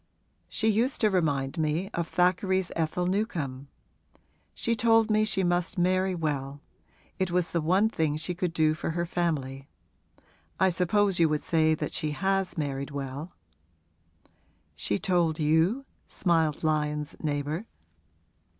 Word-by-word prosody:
She 220 - -1
used 230 +5 +1
to 215 -2 +4
remind 145 -6 0
me 160 +6 -1
of 170 -1 -2
Thackeray's 185 +1 +1
Ethel 165 +2 -1
Newcome. 165 - -2 0.9
She 230 - 0
told 225 -1 +3
me 215 0 +3
she 195 -2 0
must 175 +3 0
marry 185 +1 +2
well: 145 -4 -3 0.6
it 190 -1 +1
was 175 -1 0
the 170 - 0
one 185 +7 +3
thing 160 -8 0
she 160 +3 -3
could 175 0 -2
do 155 -2 +2
for 155 - -4
her 170 - 0
family. 140 -6 -2 0.9
I 190 - +5
suppose 185 +2 +1
you 165 -2 +5
would 150 -1 -1
say 160 -1 +3
that - - -4
she 150 -1 -2
has 195 -2 0
married 140 -2 -2
well.' 140 +3 -6 1.4
'She 80 +7 -1
told 170 - +1
you?' 160 - +2 0.2
smiled 165 -4 +1
Lyon's 150 -1 -1
neighbour. 150 +6 -2
170 Hz, 140 wpm, -28 LUFS, 150-190 Hz, 1.4 s, I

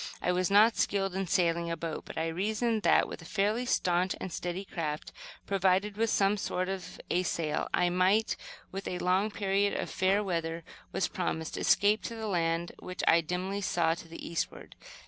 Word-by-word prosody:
I 180 - +1
was 180 +1 +1
not 210 +3 +6
skilled 195 -2 +1
in 190 0 -2
sailing 170 -1 +1
a 165 - -2
boat, 165 -2 -5
but - - -9
I 160 - 0
reasoned 215 +6 0
that, - - +4
with - - -8
a - - -11
fairly 215 +6 0
staunch 180 -2 +1
and 185 - -5
steady 180 +2 -3
craft, 155 -4 -4 0.3
provided 195 +1 +2
with 225 +1 +1
some 200 +1 +3
sort 185 -2 -2
of 190 -2 -5
a 180 - +3
sail, 160 -4 -1
I 175 0 +2
might, 190 +5 +3 0.4
when 195 - -4
a 180 - -2
long 185 +4 +2
period 200 -1 +1
of - - -3
fair 195 +2 +2
weather 165 -3 -2 0.3
was 190 - 0
promised, 160 -3 -3
escape 205 +2 +3
to 230 - -4
the 220 -1 -5
land 170 -3 0
which 185 - -6
I 165 +1 +6
dimly 185 +5 -3
saw 170 -3 +2
to 170 - -9
the 165 - -8
eastward. 170 - -4
185 Hz, 190 wpm, -30 LUFS, 170-200 Hz, 0.4 s, not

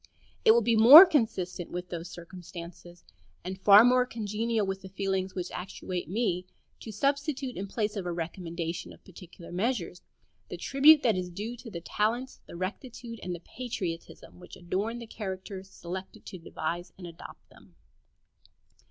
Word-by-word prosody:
It - - +4
will 235 0 +3
be 230 +1 +2
more 265 - +12
consistent 220 - -1
with 180 0 -6
those 170 0 -6
circumstances, 175 0 -11 0.4
and 190 +2 -6
far 205 +3 +8
more 250 0 +5
congenial 225 -1 -2
with 195 0 -4
the 190 - -10
feelings 190 -1 -2
which 180 -1 -4
actuate 180 -1 -5
me, 185 -3 -1 0.3
to 220 - -8
substitute, 275 +2 -1
in 195 - -5
place 210 +1 -2
of 190 -3 -4
a - - -1
recommendation 170 0 -5
of - - -19
particular 180 -1 -13
measures, 185 -2 -2 0.5
the - - -6
tribute 290 +2 +6
that 225 -4 +3
is 180 -1 -3
due 210 +7 -6
to 235 - -10
the 170 -5 -7
talents, 230 +8 -2
the - - -10
rectitude, 230 +5 -6
and 180 -1 -4
the 170 - -11
patriotism 185 -9 -6
which 180 - -12
adorn 200 +7 -3
the 235 - -8
characters 190 -2 -7
selected 185 +1 -8
to 185 - -9
devise 170 +1 -5
and 185 - -9
adopt 170 -1 -12
them. - - -20
190 Hz, 160 wpm, -28 LUFS, 175-230 Hz, 0.5 s, more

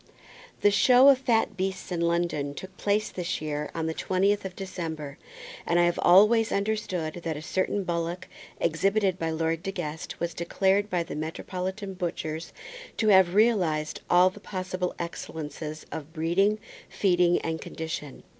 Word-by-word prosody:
The 205 - +5
show 255 +5 +6
of 270 -2 +6
fat 235 -4 +1
beasts 190 0 -3
in 170 -1 -1
London 170 -4 0
took 190 +3 -9
place 205 +2 0
this 180 -1 -3
year 150 -1 -3
on 165 -1 -2
the 160 - -1
twentieth 195 +4 +1
day - - -4
of 180 - -22
December, 160 -7 -6 0.4
and 170 - +2
I - - +5
have 175 0 0
always 215 +5 +6
understood 190 -6 -2
that 160 -2 -2
a - - -6
certain 190 +3 -1
bullock 170 +1 -3 0.3
exhibited 190 +3 +1
by 165 - -1
Lord 160 0 -1
De 195 - -3
Guest 160 -4 -6
was 170 0 -2
declared 195 +4 +1
by 175 -3 0
the - - -7
metropolitan 185 +5 -4
butchers 165 -3 -4 0.5
to 215 - +2
have 190 -2 +5
realized 180 -9 +2
all 180 +1 +6
the 210 - -13
possible 185 -2 -4
excellences 155 -2 -6
of 160 +1 -7
breeding, 175 +6 +2 0.3
feeding, 180 -3 +3
and 160 0 -3
condition. 160 -3 -6
175 Hz, 160 wpm, -27 LUFS, 160-195 Hz, 0.5 s, show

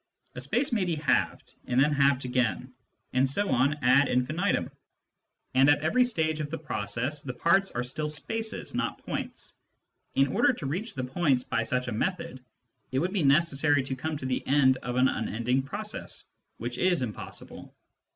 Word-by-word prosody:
A 125 - -7
space 240 - 0
may 215 -5 +2
be 175 -3 -1
halved, 150 -4 0
and 125 0 +1
then 145 +3 +4
halved 140 -2 +2
again, 125 0 -1 0.4
and 130 +1 +3
so 200 +8 -1
on 130 +3 +3
ad 130 +3 +5
infinitum^ 155 +10 0 0.8
and 135 +2 +5
at 145 0 +4
every 170 +12 +3
stage 160 -9 0
of 150 -1 -3
the 165 - -4
process 130 0 -2
the 125 -3 -6
parts 190 +8 +3
are 120 - -3
still 150 +5 -2
spaces, 220 +10 +1
not - - -2
points. - - -4 0.6
In 135 0 +3
order - - +4
to - - -7
reach 185 - -3
points 130 0 0
by 115 - -1
such 125 +2 -1
a - - -2
method, 165 - -3 0.5
it 130 - -1
would 180 +7 0
be 200 - +1
necessary 145 -1 +3
to 130 0 -4
come 155 +4 -3
to 130 - -7
the 130 -1 -1
end 130 -2 +4
of 125 -1 -5
an 130 +1 +4
unending 125 +2 -1
process, 205 +10 -3 0.3
which 120 +2 -5
is 180 -7 +2
impossible. 110 -4 -8
140 Hz, 175 wpm, -28 LUFS, 125-165 Hz, 0.8 s, ad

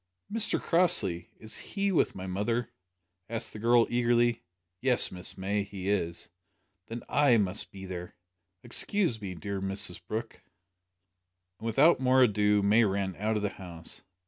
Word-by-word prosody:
"Mr 225 -1 +2
Crossley! 115 - +2
is 110 -1 -7
he 200 -1 -2
with 175 - +2
my 95 - -6
mother?" 105 +6 -2 0.6
asked 115 0 -4
the 110 - -8
girl 120 +1 +4
eagerly. 120 -1 +2 0.4
"Yes, 125 -2 +2
Miss 90 +1 -6
May, 100 +2 -1
he 100 -1 -6
is." 85 -5 -2 0.6
"Then 115 +1 -6
I 140 -3 +4
must 100 -1 -1
be 95 -1 -9
there. 90 -1 -7 0.5
Excuse 120 - -1
me, 95 -3 -5
dear 100 +1 -4
Mrs 95 -2 +1
Brooke." 115 +2 -5 1.2
And 115 - -5
without 140 +9 +4
more 130 0 +4
ado 105 -2 +3
May 105 +4 +5
ran 95 -2 -1
out 110 +2 0
of 105 - -3
the 105 - +1
house. 85 -4 -8
105 Hz, 150 wpm, -29 LUFS, 95-120 Hz, 1.2 s, May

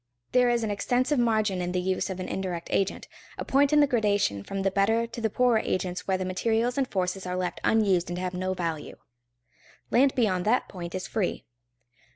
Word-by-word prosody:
There 250 -1 +4
is 240 -1 +1
an 215 - -1
extensive 250 +7 +1
margin 215 -5 +1
in 180 0 -3
the 180 - +1
use 185 +2 -1
of 190 -1 -5
an 185 - -4
indirect 180 -3 -4
agent, 195 0 -1 0.3
a - - -4
point 275 +1 +3
in 300 0 +5
the - - +6
gradation 205 - +1
from 195 - -4
the 195 - +1
better 225 +4 +2
to 230 0 -8
the 220 - +1
poorer 245 0 +3
agents 185 -3 -3
where 190 -1 +2
the 185 - -3
materials 225 +6 0
and 270 -2 0
forces 185 -2 -2
are 180 0 -2
left 180 -1 -3
unused 195 -6 +2
and 175 - -4
have 180 0 -3
no 185 +1 -2
value. 165 -4 -4 1.0
Land 270 +2 +4
beyond 190 -7 +1
that 235 +4 +2
point 175 -1 -7
is 185 - -3
free. 210 -5 -2
195 Hz, 205 wpm, -27 LUFS, 185-235 Hz, 1.0 s, the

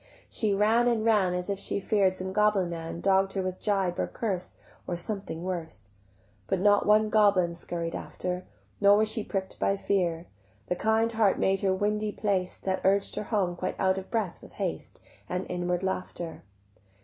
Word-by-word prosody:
She 210 -3 +1
ran 220 +4 +3
and 230 -2 +1
ran 200 -5 +3
As 180 0 -3
if 200 -1 -2
she 200 - -2
fear'd 195 -2 +2
some 190 0 -4
goblin 210 -4 +2
man 165 0 -5
Dogg'd 195 0 +3
her 195 - -1
with 185 0 -4
gibe 195 -4 0
or - - +1
curse 195 -6 -3 0.3
Or 175 - -2
something 180 -3 -4
worse: 160 - -5 0.6
But 190 - 0
not 205 +1 +4
one 215 0 +4
goblin 200 -5 +4
scurried 170 0 -4
after, 180 0 -4 0.4
Nor 200 0 +6
was 215 0 +2
she 220 -1 -2
prick'd 190 -2 -4
by 195 - +1
fear; 175 -4 0 0.4
The 180 - +1
kind 220 +4 +2
heart 220 -4 +3
made 195 0 +1
her 195 - +2
windy 210 +2 0
paced 195 -4 -1
That 190 -1 -1
urged 195 +1 +2
her - - -3
home 195 -6 0
quite 185 +1 -3
out 190 0 +2
of 190 - -11
breath 215 -7 -2
with - - -14
haste - - -4 0.3
And 180 +1 -2
inward 180 0 -1
laughter. 180 -3 -4
190 Hz, 185 wpm, -28 LUFS, 180-210 Hz, 0.6 s, Nor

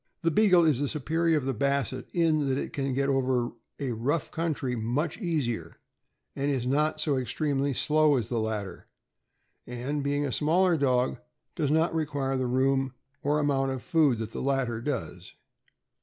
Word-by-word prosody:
The 165 - +3
Beagle 180 -2 +5
is 150 -6 +3
the 145 - 0
superior 160 +3 +1
of 140 - -2
the 135 - 0
Basset 135 0 -1
in 155 -4 +2
that 130 - +1
it - - -4
can 135 -2 -2
o^et 140 +1 +1
over 130 -3 +1 0.3
a 135 -3 -2
rough 135 +8 -1
country 155 -6 -2
much 125 - -2
easier, 155 - -2 0.6
is 140 -3 -1
not 150 +4 +1
so 145 -4 +1
extremely 140 +2 -1
slow 155 0 +3
as 115 -4 -2
the 120 -1 -1
latter, 105 -4 -4 0.8
and, 125 +5 -3
being 145 +1 0
a 135 - -2
smaller 170 - +3
dog, 130 -4 +1 0.4
does 145 - 0
not 160 +3 +2
re 160 -2 0
quire 135 -2 -2
the 130 -1 0
room 135 +1 +1 0.3
or 145 +2 +1
amount 135 -2 +1
of 130 - -6
food 155 -8 +3
that 110 0 -5
the - - -5
latter 130 -4 0
does. 120 - -5
140 Hz, 170 wpm, -28 LUFS, 125-155 Hz, 0.8 s, Beagle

